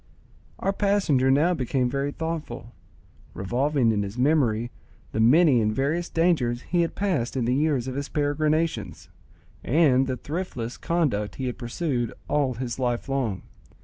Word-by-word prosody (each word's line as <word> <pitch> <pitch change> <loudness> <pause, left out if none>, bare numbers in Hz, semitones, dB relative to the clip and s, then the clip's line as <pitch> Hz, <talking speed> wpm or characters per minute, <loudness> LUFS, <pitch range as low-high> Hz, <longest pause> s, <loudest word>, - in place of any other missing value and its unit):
Our 195 - -1
passenger 195 -11 +2
now 150 +7 +4
became 130 -3 0
very 140 +3 -2
thoughtful, 150 -8 -5 0.6
revolving 125 +5 +1
in 105 -2 0
his 100 +3 -5
memory 125 -5 +2 0.4
the - - -3
many 130 +2 +5
and 105 0 +1
various 145 +9 -1
dangers 145 -8 +1
he 175 -1 +1
had 165 - -1
passed 175 -12 -1
in 125 - 0
the 125 - +1
years 140 -3 +1
of 130 - -3
his 140 +1 -4
peregrinations, 155 +2 -1 0.5
and 135 -2 +3
the 130 -1 -2
thriftless 145 -8 -5
conduct 145 -12 -1
he 130 - -4
had 125 - -4
pursued 120 -1 -2
all 140 -4 +1
his 125 +1 -4
life 120 0 -1
long. 125 -9 -2
135 Hz, 150 wpm, -25 LUFS, 120-155 Hz, 0.6 s, many